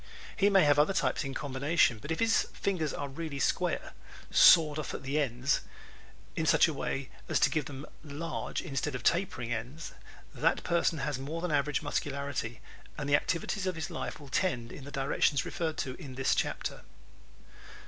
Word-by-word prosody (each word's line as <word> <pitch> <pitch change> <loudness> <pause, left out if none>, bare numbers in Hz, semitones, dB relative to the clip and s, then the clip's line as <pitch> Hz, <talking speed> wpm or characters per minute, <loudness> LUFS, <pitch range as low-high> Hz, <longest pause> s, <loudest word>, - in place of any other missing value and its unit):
He 200 0 +4
may 195 -3 +6
have 145 -1 +4
other 170 +6 +3
types - - +1
in 135 -1 -5
combination 140 -3 +1
but 150 - -9
if 160 - -1
his 225 0 +3
fingers 165 -7 -1
are 145 - -4
really 140 +1 -5
square - - 0 0.4
"sawed 155 -3 +7
off 150 - -4
at - - -7
the 140 +3 0
ends" 130 +1 +1 0.7
in - - -1
such - - +6
a - - -2
way 135 -1 -3 0.2
as - - +2
to - - +4
give 155 -4 0
them 140 0 -7 0.2
large 155 +2 -4
instead 145 -3 -2
of 125 - -5
tapering 170 -10 +1
ends 125 +8 -6 0.4
that - - +1
person 170 -1 +1
has 145 -2 -2
more 150 +5 -4
than 175 -1 -2
average 145 -1 +1
muscularity 140 -5 -3 0.4
and 145 - -3
the 145 - +5
activities 185 +5 -1
of 185 - -1
his 160 +1 -4
life - - -5
will 145 -2 -12
tend 125 -9 0
in 140 - -9
the 145 - -8
directions 135 -1 +1
referred 160 -2 -3
to 130 - -2
in 135 -5 -8
this 135 0 +2
chapter. - - -2
145 Hz, 185 wpm, -30 LUFS, 135-165 Hz, 0.7 s, sawed